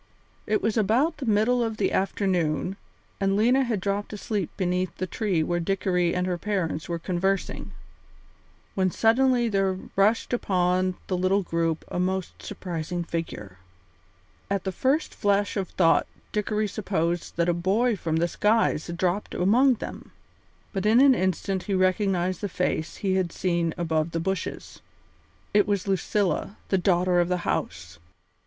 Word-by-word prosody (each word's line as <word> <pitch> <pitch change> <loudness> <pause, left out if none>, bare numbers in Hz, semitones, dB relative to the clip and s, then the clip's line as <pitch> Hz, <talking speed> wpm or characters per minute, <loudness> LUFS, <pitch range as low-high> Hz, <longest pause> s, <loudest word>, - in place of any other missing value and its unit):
It 215 - +1
was 220 +1 +1
about 245 - +2
the 265 - -5
middle 225 +3 +3
of 225 -1 -3
the - - +1
afternoon, 185 -2 0 0.4
and 195 -1 +1
Lena 250 +5 +4
had 235 -5 -1
dropped 200 +2 -2
asleep 205 -3 -2
beneath 180 -2 -1
the 185 - -2
tree 185 -4 0
where 175 +2 -1
Dickory 180 -1 0
and 180 0 0
her 180 -1 -2
parents 180 -6 -2
were 170 - -1
conversing, 185 +3 -2 1.0
when 185 -1 +1
suddenly 240 +4 +3
there 195 -3 +1 0.2
rushed 210 +5 +2
upon 185 -4 +1
the 185 - -1
little 185 +2 +2
group 165 -2 -1
a - - -4
most 185 0 -2
surprising 175 -3 -4
figure. 105 - -5 0.9
At 200 -2 -1
the 190 - -2
first 270 - 0
flash 205 0 +1
of 195 -3 -2
thought 165 -3 +3 0.2
Dickory 210 0 0
supposed 175 -5 -2
that 170 0 +2
a 175 - +3
boy 205 +8 +1
from 165 -4 -2
the 170 +2 +2
skies 210 -3 +1
had 170 0 -5
dropped 185 +3 -1
among 245 +8 +4
them, - - -8 0.6
but 195 0 -1
in 225 +3 +5
an 275 0 +7
instant 190 -2 -1
he 195 - +2
recognised 185 -1 +1
the 205 - -2
face 170 -2 -2
he 195 -2 -1
had 180 -3 0
seen 170 -2 0
above 160 -1 -1
the 165 - 0
bushes. 190 0 -4 0.7
It 205 -1 +4
was 200 -2 -1
Lucilla, 195 +1 0
the 190 - +2
daughter 180 0 +2
of 175 0 +2
the 180 -1 -1
house! 85 0 -3
190 Hz, 160 wpm, -26 LUFS, 175-210 Hz, 1.0 s, an